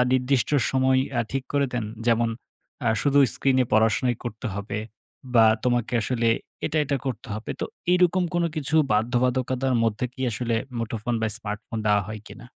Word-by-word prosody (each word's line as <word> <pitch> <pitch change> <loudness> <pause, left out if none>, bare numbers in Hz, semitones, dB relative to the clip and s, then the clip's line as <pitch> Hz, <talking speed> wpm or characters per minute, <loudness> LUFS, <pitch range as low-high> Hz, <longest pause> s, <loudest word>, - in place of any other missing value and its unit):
নির্দিষ্ট 130 0 +2 0.2
সময় 130 0 +3 0.2
আ - - +4
ঠিক 135 -1 -2
করে 140 -1 +2
দেন? 120 -3 -1 0.2
যেমন 115 0 +3 0.6
আ - - +4
শুধু 145 0 +3 0.2
স্ক্রিনে 130 -1 +2
পড়াশোনাই 110 +2 +3
করতে 115 +1 -5
হবে। 100 +2 -4 0.6
বা 115 -1 +7 0.2
তোমাকে 120 -1 +1
আসলে 115 -1 0 0.4
এটা, - - -3
এটা 140 0 0
করতে 125 0 -4
হবে। 110 +1 -6
তো - - 0 0.3
এইরকম 180 0 +3
কোনো 175 -1 +2
কিছু 150 +1 -2 0.2
বাধ্যবাধকতার 125 +3 +1
মধ্যে 115 +1 0
কি 130 - -12
আসলে 115 +2 -2 0.2
মুঠোফোন 115 +1 -2
বা - - +2
স্মার্টফোন 105 +1 -5
দেওয়া 105 -1 +4
হয় 110 0 -6
কিনা? 120 -1 -11
120 Hz, 160 wpm, -25 LUFS, 115-130 Hz, 0.6 s, বা